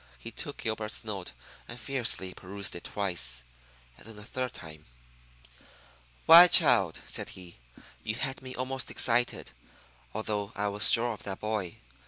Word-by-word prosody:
He - - -10
took - - -7
Gilbert's 110 -1 -4
note 100 -5 -7 0.4
and 120 - -10
fiercely 115 -7 -2
perused 100 +2 -4
it 85 - -10
twice, 75 -12 0 0.5
and - - -16
then 110 -2 -13
a 105 - -10
third 125 +2 -5
time. 80 -1 -12 1.4
"Why, 170 +2 +10
child," 120 - +4
said - - -4
he, 90 -7 -14 0.4
"you 110 - -3
had 135 +2 -5
me 130 -1 -9
almost 130 +1 -4
excited, 120 - +1 0.6
although 105 -1 -4
I 105 0 -2
was 100 0 +8
sure 120 0 +1
of 105 - -11
that 95 -1 -7
boy. 105 -5 -4
105 Hz, 150 wpm, -28 LUFS, 95-120 Hz, 1.4 s, Why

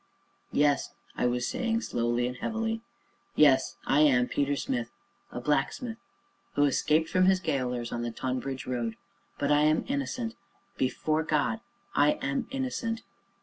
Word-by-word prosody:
"Yes," 145 -1 +2 0.2
I 125 - +1
was 120 0 0
saying, 230 -2 0
slowly 120 - 0
and 125 +1 -3
heavily; 225 - -2 0.5
"yes, 135 -3 +5
I 140 - +3
am 130 -5 +5
Peter 145 0 0
Smith 120 -3 -2 0.4
a - - -4
blacksmith 150 - -1 0.6
who 145 - +4
escaped 155 +3 +3
from 185 0 +3
his 190 -1 +5
gaolers 125 -7 -1
on 120 - -2
the 120 - -2
Tonbridge 130 +2 -3
Road 120 -3 -2 0.4
but 140 +1 0
I 145 0 +5
am 155 +1 +3
innocent 260 -4 -2 0.4
before 155 +4 0
God 155 +7 +1 0.3
I 145 +1 +4
am 140 0 -2
innocent. 250 -4 -2
145 Hz, 145 wpm, -29 LUFS, 125-190 Hz, 0.6 s, yes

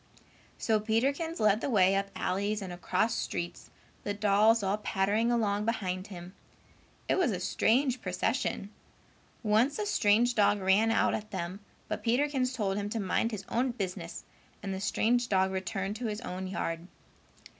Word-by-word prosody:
So 220 -2 +1
Peterkins 275 +10 0
led 215 0 +3
the - - -1
way 195 -5 +4
up 195 0 0
alleys 200 +3 -1
and 185 -2 -6
across 220 +5 0
streets, 175 -5 -4 0.3
the 205 - -2
dolls 210 +2 +4
all 195 +2 0
pattering 210 +3 +1
along 210 -3 +1
behind 185 -5 -2
him. 180 -2 -9 0.7
It - - +2
was 345 -8 +3
a 190 -5 -2
strange 245 +7 +1
procession. 185 +2 -1 0.7
Once 225 +6 +3
a 425 - -2
strange 235 - +3
dog 205 -1 +3
ran 195 +4 +3
out 225 - +2
at 215 0 -4
them, 185 -1 -4 0.3
but - - -4
Peterkins 255 +1 +1
told 205 -5 -1
him 205 0 -2
to 225 - -2
mind 200 +3 +1
his 205 -4 -6
own 245 +1 0
business 185 -6 -5 0.4
and 195 -1 -3
the 190 - -4
strange 240 +4 +1
dog 190 -1 +2
returned 195 +2 -3
to 240 0 -3
his 210 +1 -4
own 185 -4 -5
yard. 165 -2 -3
210 Hz, 165 wpm, -30 LUFS, 190-230 Hz, 0.7 s, way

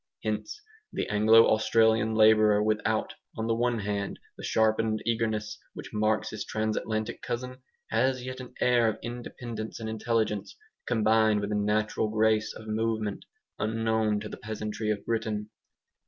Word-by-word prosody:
Hence 110 - -3 0.3
the - - -2
Anglo 110 +2 +6
Australian 110 0 +3
labourer 110 -1 +5
without, 110 0 0 0.2
on 110 - -2
the 115 - +1
one 120 +1 +1
hand, 100 -1 -3 0.2
the - - -11
sharpened 110 0 +2
eagerness 110 -2 -1 0.2
which - - -9
marks 110 0 +1
his 110 - -4
Transatlantic 110 0 -2
cousin, 125 +1 -5 0.3
has 130 +3 +1
yet 130 0 -6
an 125 -1 -10
air 120 -2 +4
of 110 -1 0
independence 120 -2 -6
and 110 - -5
intelligence, 110 -2 -1 0.3
combined 110 -2 +3
with 105 0 -3
a - - 0
natural 105 +1 0
grace 110 0 +2
of 110 - -11
movement, 110 -1 -2 0.3
unknown 110 -1 +1
to 105 - -5
the - - -8
peasantry 110 0 -4
of 105 -1 -2
Britain. 110 -2 -2
110 Hz, 145 wpm, -28 LUFS, 105-115 Hz, 0.3 s, Anglo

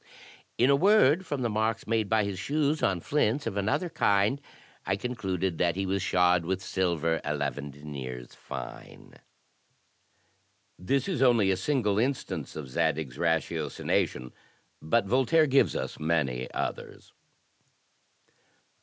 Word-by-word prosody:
In 125 +3 +4
a - - +6
word, 190 -1 +4
from 140 -3 -2
the - - +2
marks 110 +1 -1
made 110 -2 0
by 110 -1 +3
his 100 -2 -4
shoes 150 +5 0
on 95 -3 +1
flints 140 - 0
of - - -3
another 110 - 0
kind, 110 -4 +1 0.4
I 95 - 0
concluded 95 -6 -3
that 85 -2 +2
he 95 0 -2
was 95 0 -1
shod 90 -1 +3
with 95 +2 -1
silver 85 -4 0
eleven 75 -1 -3
deniers 70 -4 -8
fine." - - -9 1.7
This 135 - 0
is 185 -8 -2
only 115 -7 +4
a - - +2
single 105 -1 0
instance 130 +3 -2
of 75 -3 -6
Zadig's 80 -2 -1
ratiocination, 80 -6 -1 0.5
but 105 +8 +1
Voltaire 135 +9 +3
gives 135 -1 +3
us - - -4
many 70 -6 -1
others. - - -5
95 Hz, 130 wpm, -28 LUFS, 80-125 Hz, 1.7 s, a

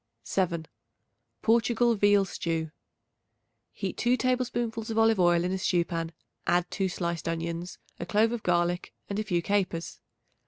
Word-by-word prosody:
7. 170 -4 -1 0.8
Portugal 235 +1 +3
Veal 205 -2 +4
Stew. 165 -3 -3 1.0
Heat 195 -2 -4
2 245 +1 +2
tablespoonfuls 240 -3 -1
of 225 - -2
olive 225 -2 +4
oil 175 -1 +4
in 180 - -1
a 190 - -1
stew 175 -1 +2
pan; 165 -2 -3 0.4
add 175 0 +3
2 195 -2 0
sliced 170 -2 -3
onions, 165 +2 -4 0.2
a - - -3
clove 215 +4 +3
of 240 -2 -3
garlic 175 0 0 0.2
and 200 - -1
a - - 0
few 175 -5 0
capers. 185 -4 -1
190 Hz, 150 wpm, -28 LUFS, 170-225 Hz, 1.0 s, Veal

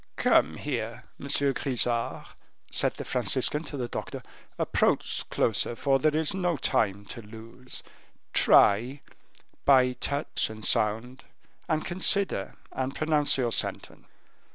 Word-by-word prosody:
"Come - - +2
here, - - -4 0.2
Monsieur 140 0 0
Grisart," 120 -3 -1 0.4
said - - +2
the - - -7
Franciscan 150 +2 +1
to 145 - -7
the 125 -2 -3
doctor; - - -6 0.3
"approach - - 0
closer, 120 - 0
for 135 +3 +1
there 155 +2 +1
is 160 +2 0
no 180 -4 -1
time 100 -5 0
to 115 - -8
lose. 115 +4 -11 0.5
Try, 120 +8 +4 0.6
by 130 -2 +5
touch 140 +3 -2
and 110 -1 -7
sound, 115 +5 0 0.4
and 155 -1 0
consider 185 - +1 0.2
and 130 +1 -4
pronounce 155 -2 +2
your 120 -3 0
sentence." 100 - -4
130 Hz, 125 wpm, -27 LUFS, 115-150 Hz, 0.6 s, by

